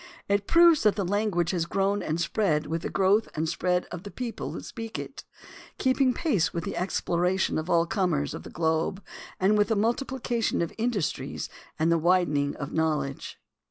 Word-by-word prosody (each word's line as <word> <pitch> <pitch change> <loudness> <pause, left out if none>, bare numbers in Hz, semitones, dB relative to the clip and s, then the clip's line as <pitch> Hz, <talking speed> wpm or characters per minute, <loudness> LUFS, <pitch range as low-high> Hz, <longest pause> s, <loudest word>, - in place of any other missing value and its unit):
It 200 0 +1
proves 335 -2 +6
that 210 -3 +3
the 200 -2 -1
language 185 -3 0
has 170 -3 -1
grown 195 +2 0
and 155 +2 -2
spread 170 -4 +1
with 160 +2 -3
the - - -3
growth 200 +3 +3
and 155 +1 -1
spread 180 +2 0
of 175 - -6
the 200 - -8
people 240 +1 -5
who - - -6
speak 225 -2 -6
it, - - -7 0.5
keeping 260 0 +3
pace 245 - +1
with 170 - -3
the - - -4
exploration 180 -1 0
of 160 +3 -5
all 170 0 +4
comers 170 -6 0
of - - -6
the - - -10
globe 160 +4 -1 0.4
and 205 +2 +3
with 205 - +4
the 225 - +1
multiplication 235 +2 0
of 170 - -5
in 235 +2 +2
dustries 200 -10 -3 0.3
and 160 +2 +2
the 165 - +3
widening 155 -5 +2
of 145 - -6
knowledge. 155 -4 -1
185 Hz, 190 wpm, -27 LUFS, 165-215 Hz, 0.5 s, proves